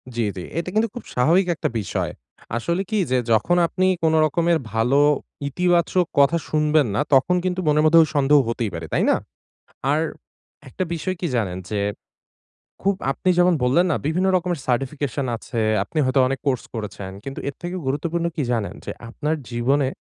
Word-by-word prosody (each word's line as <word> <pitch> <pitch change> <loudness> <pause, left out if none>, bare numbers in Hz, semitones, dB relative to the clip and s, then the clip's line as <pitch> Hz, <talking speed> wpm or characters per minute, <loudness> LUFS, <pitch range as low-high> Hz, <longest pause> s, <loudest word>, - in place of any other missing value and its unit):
জি, 120 - 0
জি 90 - -5
এটা 170 +2 -2
কিন্তু 220 +1 +2
খুব 245 - -6
স্বাভাবিক 170 +9 +3
একটা - - -2
বিষয়। 100 - -2 0.5
আসলে 170 +10 -1
কি 215 - 0
যে 130 - +3
যখন 175 +11 +3
আপনি 185 +2 0 0.2
কোনো 160 0 +3
রকমের 170 +2 +2 0.2
ভালো 125 +5 +2 0.5
ইতিবাচক 175 +2 +2
কথা 155 +4 +5
শুনবেন 150 -3 +2
না, - - +2
তখন 135 +7 +4
কিন্তু 185 0 -1
মনের 150 0 +4
মধ্যে 165 +1 +7
ওই 155 - -2
সন্দেহ 145 +1 +5
হতেই 115 -2 -1
পারে। 85 -1 -5
তাই - - +2
না? - - +4 0.8
আর, 150 - +2 0.7
একটা 185 +8 -3
বিষয় 185 +3 -3
কি 180 - -1
জানেন 95 -5 -1
যে, 105 - -1 1.0
খুব 200 0 +2 0.2
আপনি 185 - -1
যেমন 180 0 +5
বললেন 135 +9 +3
না, - - +2
বিভিন্ন 180 +4 +1
রকমের 175 -3 -1
সার্টিফিকেশন 135 +1 -1
আছে, 115 0 -4 0.2
আপনি 160 - -9
হয়তো 130 +1 +2
অনেক 135 0 -2
কোর্স 130 -3 +1
করেছেন 100 -3 -6
কিন্তু 135 0 -6
এর 140 - -4
থেকেও 175 +1 -4
গুরুত্বপূর্ণ 165 +5 -1
কি 150 - -1
জানেন? 110 -4 -1
যে - - -4 0.2
আপনার 150 +5 -2 0.2
জীবনে 130 +4 +1
150 Hz, 175 wpm, -22 LUFS, 125-175 Hz, 1.0 s, মধ্যে